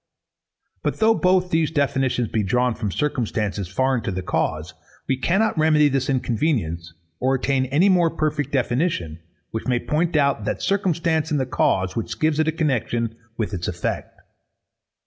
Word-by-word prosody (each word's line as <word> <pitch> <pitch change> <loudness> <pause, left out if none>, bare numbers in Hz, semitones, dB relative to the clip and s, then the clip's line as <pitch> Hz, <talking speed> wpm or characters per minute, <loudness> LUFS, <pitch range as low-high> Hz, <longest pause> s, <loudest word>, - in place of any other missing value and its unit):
_ - - -51
But - - -2
though 225 +1 +4
both 185 -3 +2
these 160 -1 +2
definitions 135 -5 0
be 110 - -1
drawn 125 +5 +1
from 110 -2 -3
circumstances 105 -7 -2
foreign 130 +6 0
to 110 - -3
the 95 0 -4
cause, 80 -1 -2 0.3
we 135 - +2
cannot 195 +11 +1
remedy 155 -1 +4
this 135 0 -1
inconvenience, 110 - -1 0.2
or 130 +1 +2
attain 130 0 0
any 145 +9 +3
more 180 -3 +4
perfect 155 -2 -2
definition, 120 - -1 0.3
which 110 - -4
may 125 -1 +2
point 160 +6 -1
out 140 -6 +2
that - - -2
circumstance 170 -5 0
in 150 - +1
the 130 - 0
cause, 95 -6 0
which 115 - -4
gives 155 -1 +1
it 155 - +2
a - - +3
connexion 120 -7 -1 0.2
with 110 -2 -2
its 90 -2 -3
effect. - - -4
135 Hz, 165 wpm, -22 LUFS, 115-160 Hz, 0.3 s, though